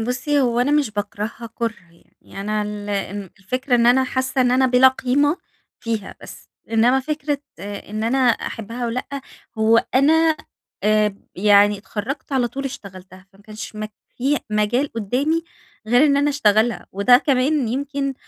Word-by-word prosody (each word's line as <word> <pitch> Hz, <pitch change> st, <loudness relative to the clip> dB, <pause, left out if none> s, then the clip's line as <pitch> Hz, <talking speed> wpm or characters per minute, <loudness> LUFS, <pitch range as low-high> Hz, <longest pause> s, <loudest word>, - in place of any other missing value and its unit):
بُصّي، 260 Hz, +5 st, 0 dB
هو 245 Hz, -2 st, +1 dB
أنا 285 Hz, +4 st, +2 dB
مش 295 Hz, -6 st, +2 dB
باكرهها 210 Hz, +2 st, -5 dB
كُره 230 Hz, -1 st, -2 dB, 0.5 s
يعني، 195 Hz, -, -10 dB
أنا 210 Hz, +1 st, -1 dB
ال 210 Hz, 0 st, -6 dB, 0.5 s
الفكرة 255 Hz, +6 st, -1 dB
إن 235 Hz, -1 st, +4 dB
أنا 260 Hz, +2 st, +5 dB
حاسّة 260 Hz, +1 st, -1 dB
إن 250 Hz, -1 st, +3 dB
أنا 260 Hz, +1 st, +3 dB
بلا 255 Hz, +1 st, +6 dB
قيمة 275 Hz, +5 st, +1 dB, 0.4 s
فيها. 225 Hz, -3 st, -4 dB
بس، -, -, -12 dB, 0.2 s
إنمَّا 235 Hz, +4 st, +3 dB
فكرة 295 Hz, 0 st, -2 dB, 0.2 s
آآ، 200 Hz, +2 st, -8 dB
إن 215 Hz, +1 st, -3 dB
أنا 260 Hz, +4 st, +1 dB
أحبها 235 Hz, -1 st, -1 dB
أو -, -, -1 dB
لأ، 245 Hz, +2 st, -3 dB, 0.5 s
هو 225 Hz, +1 st, +5 dB, 0.2 s
أنا 315 Hz, +4 st, +4 dB, 0.5 s
آآ، 210 Hz, -1 st, +2 dB, 0.2 s
يعني 205 Hz, +1 st, +4 dB
اتخرجت 235 Hz, +8 st, -6 dB
على 250 Hz, -3 st, +1 dB
طول 275 Hz, +3 st, -6 dB
اشتغلتها، 190 Hz, -7 st, -9 dB
فما 195 Hz, +1 st, -21 dB
كانش 215 Hz, 0 st, -9 dB
مك 215 Hz, 0 st, -5 dB, 0.3 s
في 275 Hz, +3 st, +1 dB
مجال 215 Hz, +7 st, 0 dB
قدّامي 260 Hz, +10 st, -1 dB, 0.4 s
غير 245 Hz, +6 st, +4 dB
إن 280 Hz, -2 st, +3 dB
أنا 290 Hz, +1 st, +2 dB
اشتغلها، 230 Hz, -4 st, +2 dB
وده 225 Hz, +6 st, +5 dB
كمان 270 Hz, -1 st, +1 dB
يمكن 275 Hz, +2 st, -2 dB
245 Hz, 160 wpm, -21 LUFS, 215-270 Hz, 0.5 s, بلا